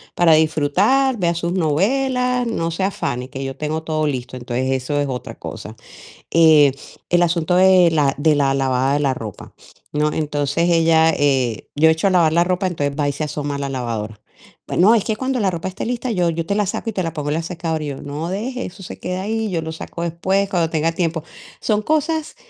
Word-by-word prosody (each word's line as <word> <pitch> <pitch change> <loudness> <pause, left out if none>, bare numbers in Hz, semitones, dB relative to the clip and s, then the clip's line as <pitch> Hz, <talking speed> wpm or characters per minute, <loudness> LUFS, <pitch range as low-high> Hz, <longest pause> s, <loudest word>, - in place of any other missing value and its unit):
para 170 -2 +5
disfrutar, 180 - +2
vea 170 -2 0
sus 170 +1 -2
novelas, 250 - +1
no 165 -7 -2
se 180 +4 -3
afane, 130 -10 -2
que 135 -1 -6
yo 135 0 -5
tengo 155 +3 -3
todo 155 -1 -1
listo". 130 -2 -4
Entonces 130 +2 -1
eso 145 +3 -3
es 145 - 0
otra 125 -2 -5
cosa. - - -8 0.6
Eh, 155 -4 +6 0.4
el 175 0 +3
asunto 170 0 +1
de 185 -1 +6
la 145 -4 +2
de 150 +1 +3
la 140 -2 +2
lavada 135 0 +1
de - - +1
la 140 -2 +1
ropa, 110 -5 -8 0.4
¿no? 150 +1 +1
Entonces 150 +2 0
ella, 165 -1 +4
eh, 130 -6 0
yo 160 +2 +5
echo 160 +5 +2
a - - +4
lavar 170 -4 +3
la 170 +1 +4
ropa, 185 +1 0
entonces 145 -5 -2
va 145 - +1
y - - -2
se 155 - -4
asoma 145 -1 -3
a - - -3
la 140 - -3
lavadora: 115 -5 -4 0.5
"Bueno, 200 +6 +4
es 215 - +1
que 220 - 0
cuando 260 +1 -2
la 200 -3 +2
ropa 175 0 -4
esté 190 - -6
lista, 245 +1 -2
yo 180 -5 +1
yo 165 0 -2
te 200 - -1
la 210 -1 +1
saco 215 +4 -3
y 220 - -4
te 185 - -1
la 165 -2 -3
pongo 150 -2 -3
en 150 - 0
la 165 - -1
secadora". 165 -2 -3
Y 150 - -4
yo: 140 -1 -6
"No, 145 +3 -5
deje, 250 +6 -3
eso 190 +2 -10
se - - -9
queda 180 +1 -3
ahí, 220 +1 -2
yo 170 -4 -1
lo 160 0 -5
saco 165 +1 -7
después 190 +4 0
cuando 175 -5 +1
tenga 160 0 0
tiempo". 165 -2 -2 0.4
Son 215 -1 +1
cosas, 315 0 -1
165 Hz, 225 wpm, -20 LUFS, 145-190 Hz, 0.6 s, Eh